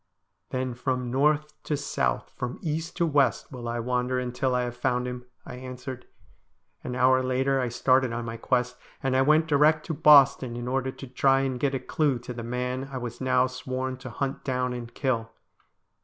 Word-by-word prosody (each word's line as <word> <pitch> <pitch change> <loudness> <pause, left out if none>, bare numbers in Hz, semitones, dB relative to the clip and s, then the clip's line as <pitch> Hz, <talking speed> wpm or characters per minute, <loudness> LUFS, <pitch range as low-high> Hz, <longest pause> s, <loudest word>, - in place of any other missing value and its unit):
' - - -51
Then 130 -1 -2
from 125 0 -2
north 150 +3 +1
to 150 - -2
south, - - -1
from 125 0 -4
east 160 +1 -3
to 170 - +2
west, 145 -4 +1
will 125 -3 -7
I 120 - -2
wander 125 +1 0
until 125 +1 -1
I 125 - +1
Lave 120 0 -4
found 125 0 0
him,' 125 0 -6 0.2
I - - -8
answered. 130 0 -8 0.8
An 125 - -4
hour 130 +1 +4
later 130 +1 +1
I 125 - -1
started 130 +1 +2
on 120 0 -3
my 115 0 -5
quest, 125 +1 0 0.3
and 135 -1 +1
I 130 - +4
went 155 +3 +4
direct 155 0 +3
to 165 - -3
Boston 140 -5 +6
in 120 0 -5
order 130 +1 -1
to 135 - -10
try 135 +1 +2
and 130 -2 -2
get 140 +1 0
a - - -1
clue 140 +1 0
to 120 +1 -7
the 120 - -6
man 125 +3 -3
I 130 - -4
was 120 -1 -6
now 130 -1 +3
sworn 130 0 -4
to 130 +1 -8
hunt 135 +4 -3
down 125 -1 -1
and 120 -1 -6
kill. 120 -5 -1
130 Hz, 200 wpm, -27 LUFS, 125-135 Hz, 0.8 s, Boston